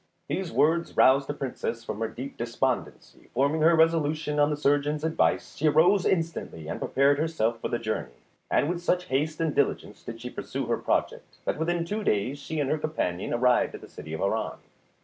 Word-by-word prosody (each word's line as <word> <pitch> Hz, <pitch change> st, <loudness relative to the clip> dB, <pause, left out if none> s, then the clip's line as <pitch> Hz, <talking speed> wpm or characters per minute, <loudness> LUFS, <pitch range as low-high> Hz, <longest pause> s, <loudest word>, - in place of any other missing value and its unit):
These 175 Hz, +4 st, -2 dB
words 165 Hz, +3 st, +1 dB
roused 135 Hz, +1 st, +5 dB
the -, -, -2 dB
Princess 125 Hz, -4 st, -4 dB
from 110 Hz, -2 st, -5 dB
her 115 Hz, -, 0 dB
deep 130 Hz, +5 st, -7 dB
despondency; 120 Hz, +2 st, -3 dB
forming 140 Hz, +5 st, +2 dB
her 165 Hz, +2 st, +6 dB
resolution 155 Hz, -2 st, +2 dB
on 145 Hz, 0 st, +4 dB
the 150 Hz, -, -1 dB
surgeon's 145 Hz, +1 st, +1 dB
advice, 160 Hz, 0 st, +1 dB
she 155 Hz, -, +2 dB
arose 175 Hz, +6 st, +4 dB
instantly 165 Hz, -, -2 dB
and -, -, -4 dB
prepared 140 Hz, +2 st, +2 dB
herself 120 Hz, -8 st, 0 dB
for -, -, -1 dB
the 120 Hz, -, -1 dB
journey, 110 Hz, -, -3 dB, 0.4 s
and -, -, +2 dB
with 175 Hz, +1 st, -2 dB
such 180 Hz, 0 st, 0 dB
haste 150 Hz, +4 st, 0 dB
and 160 Hz, -3 st, 0 dB
diligence 140 Hz, -, -1 dB
did 115 Hz, -1 st, -8 dB
she 125 Hz, +1 st, -7 dB
pursue -, -, -4 dB
her -, -, 0 dB
project, -, -, -2 dB
that -, -, -1 dB
within 170 Hz, +1 st, 0 dB
two 210 Hz, +5 st, -3 dB
days 125 Hz, -, 0 dB
she 155 Hz, +2 st, -4 dB
and 140 Hz, -2 st, 0 dB
her 155 Hz, -, +1 dB
companion 95 Hz, -, -2 dB
arrived 125 Hz, +1 st, +2 dB
at -, -, -10 dB
the -, -, -11 dB
city 80 Hz, -, -10 dB
of 80 Hz, -, -4 dB
Harran. 105 Hz, +3 st, -1 dB
145 Hz, 200 wpm, -27 LUFS, 125-160 Hz, 0.4 s, her